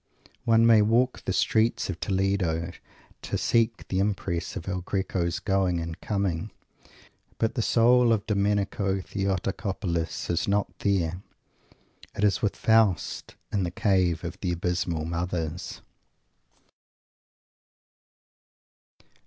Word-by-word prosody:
One 115 0 +5
may 115 -2 +7
walk 120 +4 +1
the - - 0
streets 110 +1 +2
of 95 -3 -5
Toledo 95 -4 0 0.5
to - - -3
seek 115 -1 +1
the 95 - -1
impress 95 -4 -2
of 80 - -6
El 90 -1 -2
Greco's 90 -2 -1
going 95 -2 +1
and 85 +1 -6
coming; 100 -2 -1 0.9
but 115 - 0
the 120 - -1
soul 120 +2 +4
of 110 -3 +1
Domenico 100 -1 0
Theotocopoulos 95 -3 -2
is 85 -1 0
not 100 0 -1
there. 90 -3 0 0.9
It 100 - -2
is 105 -2 +3
with 105 - 0
Faust, 110 -4 +1 0.2
in 100 - +1
the 90 - -1
cave 90 -3 +1
of 90 +2 -6
the 90 -3 -1
abysmal 85 -2 -1
"Mothers." 85 0 -3
95 Hz, 115 wpm, -26 LUFS, 85-105 Hz, 0.9 s, may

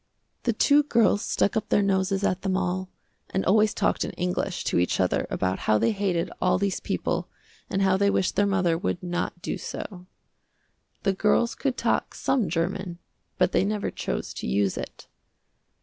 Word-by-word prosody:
The 235 - +2
two 285 +6 +5
girls 230 -7 +3
stuck 205 - 0
up 220 - -1
their 205 - +3
noses 195 0 +1
at 185 -2 +1
them 190 -1 0
all, 185 0 -2 0.4
and 190 - -1
always 210 +2 +4
talked - - 0
in - - -3
English 180 +1 -2
to - - +1
each 90 - +1
other - - +1
about 95 0 -1
how 110 - +5
they 225 - +2
hated 190 -4 -1
all 180 - +3
these 200 0 -1
people - - -2 0.4
and 195 0 0
how 190 -1 +3
they 200 +1 +3
wished 190 - +1
their 205 - +3
mother 180 -4 +1
would 180 -2 -2
not 175 0 -3
do - - -3
so. 180 -3 -7 1.0
The 195 - +2
girls 210 +4 +2
could 265 -3 -2
talk - - 0
some 240 -10 0
German, 175 +2 -2 0.4
but - - +3
they - - +3
never 205 +1 -1
chose - - -4
to - - -5
use 100 -1 +1
it. - - -7
190 Hz, 180 wpm, -26 LUFS, 180-205 Hz, 1.0 s, two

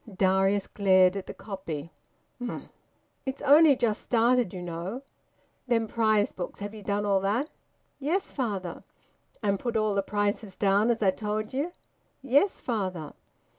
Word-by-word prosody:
Darius 195 +1 +3
glared 185 -2 +4
at 195 -1 -5
the - - -6
copy. 170 -6 -6 0.5
"Humph!" 240 - -5 0.5
"It's 265 +1 -5
only 290 +1 +7
just 225 -3 0
started, 240 -2 +2
you 180 -1 -6
know." 175 +9 -5 0.6
"Them 230 -2 +2
prize 215 -2 +2
books 175 - -6
have 205 +1 -5
ye 215 - -9
done 205 0 -1
all 200 -1 +3
that?" 215 +10 0 0.5
"Yes, 335 +8 -1
father." 200 - -3 0.6
"And 200 -2 +1
put 240 -2 -1
all 215 -1 +1
the 200 - +2
prices 205 0 -2
down, 200 +3 +3
as 230 -2 +1
I 190 - +5
told 215 +2 -3
ye?" 285 +6 -1 0.5
"Yes, 285 +9 +3
father." 185 - -3
210 Hz, 150 wpm, -28 LUFS, 195-240 Hz, 0.6 s, only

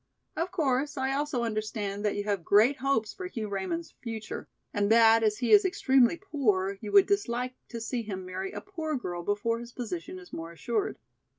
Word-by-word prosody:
Of 335 +3 -1
course 290 -4 0
I 265 0 0
also 280 -3 -1
understand 215 -2 -3
that 210 - +1
you 205 - -2
have 200 -4 -1
great 220 +10 +5
hopes 250 -5 0
for 370 - -6
Hugh 225 - -5
Raymond's 200 - -3
future, 225 -3 -6 0.3
and 205 +1 +1
that 225 0 +7
as 215 -1 +2
he 245 +1 -1
is 415 -1 +8
extremely 270 -7 +3
poor 210 - 0
you 210 - -5
would 395 - +7
dislike 255 -11 0 0.2
to 235 - -5
see 235 +2 -2
him 190 -4 -5
marry 185 +1 -4
a - - -6
poor 320 -6 -4
girl 175 -9 -4
before 205 +5 0
his 240 0 -9
position 185 -7 -5
is 180 -1 -13
more 165 0 -6
assured. 215 +6 -2
230 Hz, 195 wpm, -29 LUFS, 205-275 Hz, 0.3 s, is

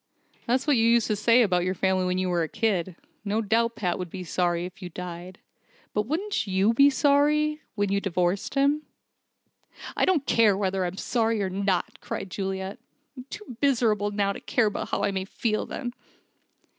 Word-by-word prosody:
"That's 255 +3 +1
what 295 -4 +3
you 225 - +3
used 235 -1 +4
to 215 - +2
say 230 +4 +4
about 180 -4 +1
your 185 +1 -1
family 190 0 +1
when 180 0 0
you 185 0 0
were 175 -1 +1
a 160 - 0
kid. 190 -4 -1 0.3
No 210 +1 0
doubt 230 +2 +1
Pat 180 -4 -1
would 180 -1 -4
be 185 +1 -6
sorry 175 0 0
if 185 +4 -10
you 180 - -6
died. 180 +1 -8 0.6
But 210 +1 -1
wouldn't 365 - -1
you 195 +4 +2
be 280 +4 +6
sorry 295 +2 +2
when 205 -2 0
you'd 200 0 +1
divorced 180 +2 -1
him?" 285 +2 +3 1.1
"I - - +2
don't 330 -7 +2
care 215 -6 +4
whether 190 -2 0
I'm 180 +2 -4
sorry 225 -3 0
or 190 - -2
not," 195 -1 -1
cried 190 - -6
Juliet. 190 +2 -4 0.4
"I'm 255 -1 -9
too 415 - -9
miserable 225 -7 +2
now 200 -1 0
to - - -8
care 240 - +1
about 205 -1 -2
how - - -1
I 200 - +1
may 190 -1 -2
feel 215 +2 -2
then." 245 -3 -5
205 Hz, 195 wpm, -26 LUFS, 185-235 Hz, 1.1 s, be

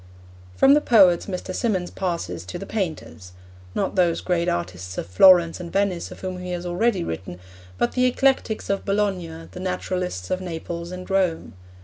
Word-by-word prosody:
From 270 - +6
the 300 - +4
poets 195 - +5
Mr. 185 -1 -4
Symonds 185 -5 -1
passes 170 - -3
to 90 - -6
the 195 - -7
painters: 160 - -5 0.4
not 195 - -1
those 175 -3 +2
great 175 -2 0
artists 90 +1 -4
of - - -3
Florence 170 - +6
and 170 -2 -7
Venice 195 -3 0
of - - -11
whom 185 -1 -4
he 180 0 -4
has 175 0 -4
already 185 - +1
written, 85 +2 -6 0.4
but 120 - +1
the 250 - +2
Eclectics 255 -3 +1
of 195 - -1
Bologna, 185 -5 -2
the - - -9
Naturalists 180 - -3
of 185 - 0
Naples 170 0 -5
and 185 0 -7
Rome. 190 -4 0
180 Hz, 170 wpm, -23 LUFS, 165-195 Hz, 0.4 s, From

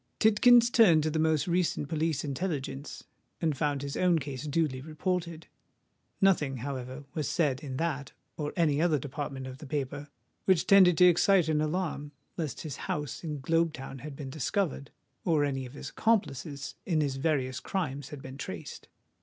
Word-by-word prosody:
Tidkins 235 +2 +6
turned 175 -11 +6
to 155 - 0
the 160 - -1
most 155 -1 +2
recent 175 -4 0
Police 160 -1 -1
Intelligence, 140 -2 -4 0.4
and 160 -4 0
found 145 -1 -1
his 140 -1 -4
own 180 -2 +3
case 140 0 -5
duly 145 -4 0
reported. 165 +2 -3 0.7
Nothing, 155 -9 +3
however, 130 0 -5
was 150 -3 -2
said 145 -7 +1
in 130 -3 -5
that 145 -4 -2 0.2
or 150 -1 -3
any 155 -3 +2
other 165 -3 +3
department 140 -1 -5
of 130 0 -8
the 150 - -9
paper, 145 0 -3 0.4
which 185 -4 +3
tended 185 -4 +6
to 180 - +7
excite 180 0 +5
an 150 -1 +2
alarm 155 -2 -2 0.2
lest 155 -5 -4
his 150 -5 -6
house 150 +2 -3
in 150 -4 -4
Globe 165 +3 +2
Town 135 -1 -8
had 150 +1 -8
been 135 -2 -7
discovered 150 0 -1 0.3
or 155 -4 +2
any 135 -2 -2
of 125 - -14
his 145 - -7
accomplices 145 - -1
in 165 -5 0
his 140 -3 0
various 135 -3 0
crimes 145 -8 -3
had 145 -3 -9
been 130 +1 -9
traced. - - -7
150 Hz, 170 wpm, -29 LUFS, 140-170 Hz, 0.7 s, to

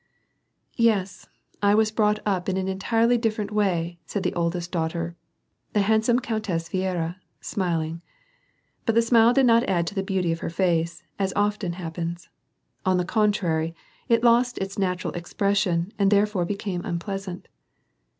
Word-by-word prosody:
" - - -44 0.2
Yes, 195 -2 -4 0.3
I 205 0 +4
was 215 0 +3
brought 210 -1 +2
up 195 -3 0
in 190 - 0
an 190 0 -1
entirely 225 +5 +2
different 215 -2 -1
way," 175 -5 0
said 200 - -3
the - - 0
oldest 170 0 -2
daughter, 170 0 -2 0.6
the 210 - +3
handsome 220 +4 +3
Countess 210 -9 -2
Viera, 180 -2 -2 0.2
smiling. 165 -4 -2 0.9
But 225 - +2
the 230 - +5
smile 230 0 +5
<£d 270 +1 +4
not 230 -1 +5
add 175 -3 +2
to 170 - -4
the 195 - -1
beauty 190 -3 0
of 165 - -2
her - - -3
face, 170 -1 0 0.2
as 190 -1 0
often 205 -3 0
happens; 170 0 -5 0.5
on 185 -1 +2
the 180 - 0
contrary 175 -6 +1 0.3
it 230 0 +3
lost 240 +1 +4
its 195 +1 -4
natural 185 -2 -1
expression 185 0 0
and 200 -1 +4
therefore 205 -3 +2
became 195 -2 -3
unpleasant. 185 +1 -5
190 Hz, 155 wpm, -25 LUFS, 170-210 Hz, 0.9 s, the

